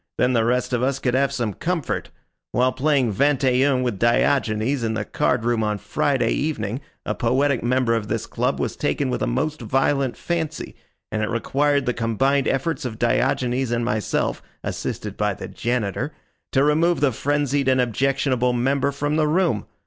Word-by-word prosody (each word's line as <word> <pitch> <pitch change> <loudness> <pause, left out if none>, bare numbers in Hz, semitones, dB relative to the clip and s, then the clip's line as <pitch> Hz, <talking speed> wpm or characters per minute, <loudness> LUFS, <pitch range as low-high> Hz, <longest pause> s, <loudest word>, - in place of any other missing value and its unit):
Then 125 +1 +2
the 115 -2 +3
rest 125 +2 0
of 120 - +1
us 135 +1 +1
could 125 -2 -1
have 135 +1 +2
some 115 -5 -2
comfort. 170 - -2 0.4
While 125 +2 +3
playing 130 -4 +1
vingt 140 +4 +2
et 130 0 +3
un 130 -1 +1
with 120 -6 -2
Diogenes 120 +1 +2
in 110 -1 -1
the 105 -1 -2
card 125 -3 0
room 120 -1 +1
on 105 -1 0
Friday 135 +6 0
evening 125 -5 -2 0.2
a - - -1
poetic 130 +2 +1
member 125 0 +1
of 115 -2 -1
this - - -2
club - - -1
was - - -2
taken 65 - -1
with 60 - -2
a - - +1
most 150 - -1
violent 135 +3 +1
fancy, 160 -3 -3 0.4
and 110 - -1
it 110 - -1
required 140 +4 +1
the 125 - +1
combined 130 +5 +1
efforts 135 +2 -1
of 120 -4 -4
Diogenes 125 +1 +1
and 120 0 0
myself, 110 -3 -1 0.2
assisted - - -4
by - - 0
the - - -7
janitor, 120 +3 -2 0.4
to 135 - +3
remove 160 +4 +3
the 145 -2 +3
frenzied 145 +2 0
and 130 -1 +3
objectionable 125 +1 +1
member 135 +3 +1
from 145 +2 -1
the 155 -1 +2
room. 160 - +1
130 Hz, 180 wpm, -22 LUFS, 120-140 Hz, 0.4 s, the